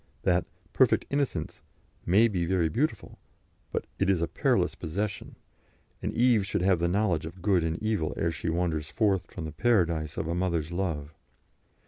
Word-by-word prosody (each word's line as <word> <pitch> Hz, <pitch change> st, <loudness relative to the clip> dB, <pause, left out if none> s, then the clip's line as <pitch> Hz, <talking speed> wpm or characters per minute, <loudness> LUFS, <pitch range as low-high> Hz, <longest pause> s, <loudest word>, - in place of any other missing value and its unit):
That 90 Hz, -1 st, +2 dB, 0.3 s
"perfect -, -, +3 dB
innocence" 140 Hz, -, -2 dB, 0.5 s
may 105 Hz, +7 st, +5 dB
be 95 Hz, -6 st, -1 dB
very 90 Hz, -3 st, +2 dB
beautiful, 145 Hz, -, -2 dB, 0.5 s
but -, -, -2 dB
it 95 Hz, -, +2 dB
is 95 Hz, -3 st, +3 dB
a 85 Hz, -, 0 dB
perilous -, -, +1 dB
possession, 100 Hz, +6 st, -4 dB, 0.7 s
and -, -, -2 dB
Eve 120 Hz, -3 st, +4 dB
should 95 Hz, -2 st, -2 dB
have 95 Hz, -2 st, +3 dB
the 85 Hz, -, +1 dB
knowledge 90 Hz, -4 st, +1 dB
of 85 Hz, +2 st, -11 dB
good 95 Hz, -4 st, +3 dB
and 80 Hz, 0 st, -1 dB
evil 105 Hz, -8 st, 0 dB
ere 85 Hz, -, +1 dB
she 80 Hz, +1 st, -3 dB
wanders 80 Hz, -2 st, -1 dB
forth 100 Hz, -4 st, +1 dB
from 85 Hz, -, -6 dB
the 80 Hz, -, -5 dB
paradise 85 Hz, -6 st, +1 dB
of 80 Hz, -, -2 dB
a 85 Hz, -, -1 dB
mother's 85 Hz, -3 st, -1 dB
love. 80 Hz, -5 st, -3 dB
90 Hz, 170 wpm, -28 LUFS, 80-100 Hz, 0.7 s, may